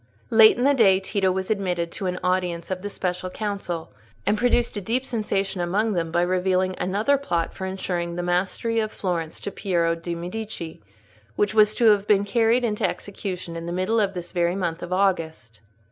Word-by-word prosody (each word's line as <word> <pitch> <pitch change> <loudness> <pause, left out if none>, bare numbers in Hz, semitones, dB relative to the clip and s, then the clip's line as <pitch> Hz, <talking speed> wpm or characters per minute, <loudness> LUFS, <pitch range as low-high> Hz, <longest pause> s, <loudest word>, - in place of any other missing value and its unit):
Late 220 -1 +7
in 245 - 0
the 285 +2 +5
day, 200 -8 +5
Tito 190 0 0
was 190 +2 -2
admitted 180 -5 -1
to 190 - -4
an 180 0 -2
audience 180 -1 -1
of 185 -1 -2
the 205 - -4
Special 180 -2 -3
Council, 195 -5 -4 0.3
and 205 - +3
produced 240 +1 +1
a 205 - -3
deep 240 +7 -1
sensation 200 -5 -1
among 205 +5 +1
them 165 -3 -1
by 175 +1 +2
revealing 185 +1 +1
another 215 +9 +1
plot 170 -12 -1
for 190 - -5
insuring 175 -2 -3
the 175 - -3
mastery 190 +6 0
of 215 -1 -1
Florence 170 -4 -3
to 200 - -4
Piero 170 -4 0
de' 170 +1 -5
Medici, 175 - -6 0.5
which 205 +1 +1
was 215 -1 +5
to 240 - +2
have 205 -1 +1
been 200 -1 +4
carried 230 +3 +2
into 210 -3 +1
execution 185 -4 -6
in 165 0 -5
the - - -3
middle 185 +6 +1
of 200 -2 0
this 175 -1 -6
very 175 0 +1
month 175 -3 -2
of 175 - -6
August. 165 - -1
190 Hz, 195 wpm, -24 LUFS, 175-210 Hz, 0.5 s, Late